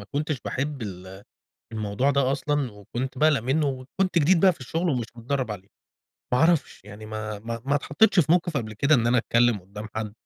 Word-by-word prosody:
ما - - -9
كنتش 150 -2 -2
باحب 140 -1 -3
ال 95 -1 -8 0.5
الموضوع 110 +5 0
ده 135 -1 +2
أصلًا، 140 -3 -1
وكنت 120 +6 -6
باقلق 155 -2 +4
منه، 145 +4 +1
وكنت 140 +8 -1
جديد 165 +3 +4
بقى 190 0 +6
في 155 - -17
الشغل 165 +7 -2
ومش 125 -6 0
متدرب 125 +1 -2
عليه. 100 -2 -7 0.6
ما 125 - +3
اعرفش 160 - +2
يعني، 105 +1 -10
ما 110 -1 -5
ما 115 +2 -5
ما 140 +2 +1
اتحطيتش 180 +8 +3
في 155 0 +2
موقف 175 -3 +1
قبل 110 -4 -3
كده 140 +8 +3
إن 115 -2 +2
أنا 120 +1 +3
أتكلم 115 -1 +2
قدّام 105 +4 -9
حد، 110 -1 -3
130 Hz, 200 wpm, -25 LUFS, 110-150 Hz, 0.6 s, بقى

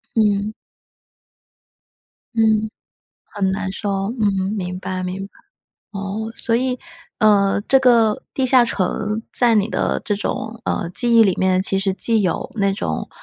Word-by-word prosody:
嗯。 210 -1 +1 1.8
嗯， 220 -1 +2 0.7
很 195 -2 0
难 195 0 -3
受。 205 +2 -5 0.3
嗯， 195 -2 0
明 180 -2 -4
白 185 -1 -4
明 185 +2 -4
白。 - - -23 0.6
哦， 200 +2 -4
所 230 0 0
以， 255 +1 -1 0.4
呃， 200 -3 +3
这 270 - +6
个 230 -4 +3
地 265 - 0
下 250 -1 +5
城 210 +1 -2
在 240 -2 +4
你 210 -1 +2
的 - - -1
这 210 - 0
种， 220 +2 -4
呃， - - -2
记 235 +6 +3
忆 225 - +8
里 190 -3 +2
面， 185 0 +2
其 195 0 0
实 195 0 0
既 220 +1 +2
有 180 - -2
那 200 -2 +1
种， - - -3
210 Hz, 160 characters per minute, -20 LUFS, 195-225 Hz, 1.8 s, 忆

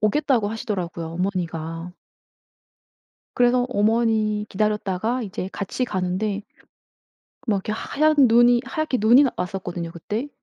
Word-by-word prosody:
오겠다고 230 0 +2
하시더라고요 185 -7 -4
어머니가. 165 -1 -3 1.4
그래서 245 0 +3
어머니 215 -1 +1
기다렸다가 210 +3 -1
이제 190 -3 -5
같이 205 +6 -2
가는데 195 +1 -2 1.0
막 215 -4 +2
이렇게 195 +2 -3
하얀 305 +7 +1
눈이 240 -1 +6
하얗게 290 -1 -2
눈이 240 +7 +6
왔었거든요 180 -3 -4
그때. 210 - -4
210 Hz, 300 characters per minute, -23 LUFS, 185-240 Hz, 1.4 s, 눈이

